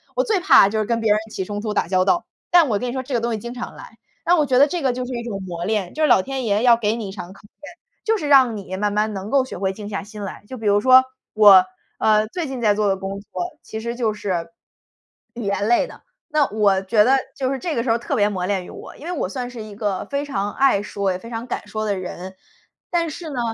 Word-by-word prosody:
我 - - +2
最 435 -5 +1
怕 355 - +6
就 220 +1 -1
是 215 - 0
跟 230 +1 0
别 220 -2 +2
人 210 - +4
起 195 - -4
冲 205 +1 -4
突 215 -2 -3
打 - - 0
交 185 0 +2
道， 345 - +2 0.2
但 350 -4 +6
我 210 -3 +1
跟 250 - -3
你 240 - -3
说 260 -1 -3
这 265 +1 -7
个 240 - +2
东 235 +1 -1
西 220 - -1
经 235 +3 -7
常 245 -1 -7
来。 - - -13 0.3
那 350 +1 +4
我 300 - +3
觉 255 -2 +2
得 280 +3 +6
这 345 +3 -3
个 265 -3 +1
就 250 0 -4
是 255 - -7
一 235 -1 -4
种 205 -5 -5
磨 175 -2 -5
炼， 205 -3 -1
就 310 - -4
是 - - +5
老 240 - +5
天 265 +2 -4
爷 210 +1 +1
要 240 -2 +6
给 220 -1 0
你 220 -4 -5
一 - - -6
场 185 -2 -8
考 195 - -18
验。 290 +8 -14 0.3
就 445 -1 +1
是 305 - -4
让 260 -6 +5
你 190 -2 -6
慢 205 +1 0
慢 210 +1 0
能 195 +1 -6
够 270 +1 +3
学 260 - -8
会 190 0 -1
静 205 0 -8
下 200 - -3
心 210 0 -9
来。 195 - -7
就 260 - -7
比 225 - -8
如 205 0 +4
说 255 +2 +7 0.3
我， 205 -3 +8 0.4
呃， 215 0 +3
最 330 +7 -4
近 265 -2 -5
在 215 -3 +3
做 210 0 0
的 195 - +1
工 195 +1 -5
作 305 - -6
其 220 - -7
实 235 +1 -4
就 230 -3 0
是 175 -5 -3 0.9
语 235 - -5
言 200 0 -1
类 240 - +3
的， - - -13 0.3
那 300 -3 +2
我 205 -3 +2
觉 210 +2 +3
得 265 +4 +4 0.2
就 260 0 -1
是 270 - -4
这 335 -1 -3
个 230 - 0
时 235 - 0
候 230 - +1
特 275 - -3
别 205 -4 +3
磨 185 -3 -3
练 190 -2 -1
于 - - -11
我。 - - -11
因 295 - -11
为 350 - -4
我 290 - -2
算 245 +3 -4
是 235 -3 -8
一 215 -1 -10
个 205 -3 -2
非 280 +1 -3
常 205 -7 -2
爱 270 -7 +3
说 200 -2 -2
也 180 - -3
非 230 - -11
常 230 0 -5
敢 245 - -5
说 215 +1 -3
的 205 -2 0
人， 185 0 -7 0.5
但 340 -1 0
是 325 +1 -7
呢， 270 -4 -4
220 Hz, 310 characters per minute, -21 LUFS, 200-260 Hz, 0.9 s, 我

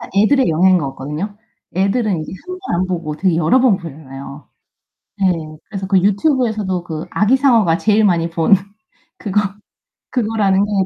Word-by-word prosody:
애들의 250 +5 +3
영향인 180 +3 +4
것 140 -4 -3
같거든요. 155 +11 -6 0.4
애들은 195 -2 +1
이제 - - -8
1 365 0 -6
번 380 - -3
안 185 - -1
보고 165 -4 -3
되게 180 0 +1
여러 170 +11 +3
번 235 -7 +4
보잖아요. 140 -3 -10 0.7
네. 190 -2 +3 0.3
그래서 195 -3 -6
그 190 0 +3
유튜브에서도 210 - +1
그 160 -1 -5
아기상어가 225 -6 +3
제일 215 0 +2
많이 170 -4 +2
본 165 +4 +3 0.6
그거 205 0 0 0.7
그거라는 210 -5 +1
게 205 - -6
190 Hz, 320 characters per minute, -18 LUFS, 165-215 Hz, 0.7 s, 영향인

